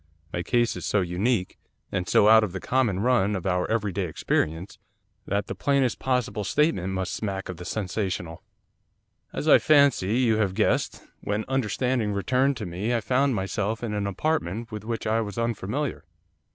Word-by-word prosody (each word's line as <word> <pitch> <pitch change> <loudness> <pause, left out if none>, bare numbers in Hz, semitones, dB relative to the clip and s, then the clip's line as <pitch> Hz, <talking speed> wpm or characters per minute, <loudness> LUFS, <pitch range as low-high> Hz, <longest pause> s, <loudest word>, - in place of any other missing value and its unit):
My 85 - -1
case 120 +6 +1
is - - -6
so 105 - +1
unique, 90 +3 -1 0.3
and 90 -2 -2
so 105 - +5
out 110 0 +7
of 100 -4 -3
the 95 - -4
common 115 -7 0
run 105 -4 +2
of 95 - -5
our 90 -1 0
every 105 -3 0
day 95 0 -2
experience, 80 +2 -2 0.5
that 100 0 0
the - - -5
plainest 140 -4 +1
possible 125 -5 -1
statement 100 - +1
must 95 -1 -2
smack 95 -3 -4
of 90 - -5
the 90 - -9
sensational. 90 -4 -3 0.9
'As, - - -4
I - - +8
fancy, 140 -8 +4
you 115 -4 +3
have 100 -4 0
guessed, - - 0 0.2
when 105 +1 -2
understanding 125 -3 0
returned 130 +7 +1
to 105 - -5
me, 95 +7 -2
I - - +2
found 130 +3 +1
myself 105 +3 -2
in 110 -3 -2
an 100 -1 -1
apartment 115 - -2
with 105 -1 -6
which 115 +1 -4
I 110 +1 +1
was 105 0 -6
unfamiliar. 115 +4 -2
105 Hz, 180 wpm, -25 LUFS, 95-120 Hz, 0.9 s, I